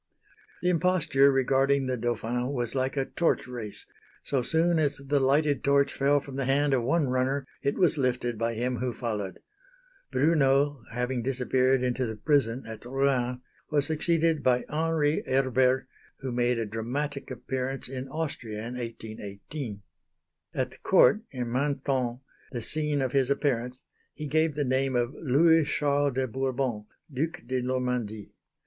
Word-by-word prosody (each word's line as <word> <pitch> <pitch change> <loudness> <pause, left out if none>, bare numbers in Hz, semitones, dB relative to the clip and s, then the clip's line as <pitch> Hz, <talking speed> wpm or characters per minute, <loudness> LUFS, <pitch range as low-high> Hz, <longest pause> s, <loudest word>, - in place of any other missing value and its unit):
The 180 - +3
imposture 165 -6 +3
regarding 135 +1 +2
the 130 0 -1
Dauphin 120 +2 -2
was 120 -3 -2
like 130 +1 -1
a 135 - +1
torch 170 -2 0
race 120 -5 -6 0.4
so 135 -3 0
soon 165 +5 +3
as 145 -3 +1
the 140 +1 0
lighted 140 +2 +2
torch 140 0 +3
fell 140 +1 +3
from 135 -1 -9
the 135 - -1
hand 140 +2 +2
of 130 - +3
one 145 +5 +1
runner 130 +2 0 0.2
it 140 - 0
was 175 -5 +3
lifted 125 -2 0
by 115 0 0
him 125 +2 -1
who 125 +1 -2
followed. 105 -6 -4 0.7
Brunneau, 140 -1 +3
having 125 +1 -1
disappeared 130 +1 +1
into 125 0 0
the 110 - -4
prison 130 0 +1
at 110 -1 -8
Rouen, 125 -1 0 0.3
was 145 -2 +2
succeeded 160 0 +1
by 125 -2 +2
Henri 155 -1 +1
Herbert 130 0 +2 0.3
who 130 -1 -3
made 120 0 +1
a 115 - -1
dramatic 130 +7 -4
appearance 130 +1 -4
in 130 0 -5
Austria 135 -7 -4
in 120 - -6
1818. 110 0 -7 0.7
At - - -1
the - - -15
Court 215 - +5
in 125 -3 -4
Mantone, 130 -2 -1 0.3
the 120 -3 -4
scene 150 -1 +1
of 130 - -1
his 135 -1 +2
appearance, 125 -3 -1 0.3
he 150 - -6
gave 155 +1 +1
the 145 -1 0
name 130 0 +1
of 120 +1 0
Louis 160 +3 +4
Charles 145 -1 +1
de 130 0 0
Bourbon, 130 -3 -2 0.3
Duc 160 +6 -2
de 130 +1 -1
Normandie. 125 -4 -2
130 Hz, 155 wpm, -28 LUFS, 125-145 Hz, 0.7 s, Court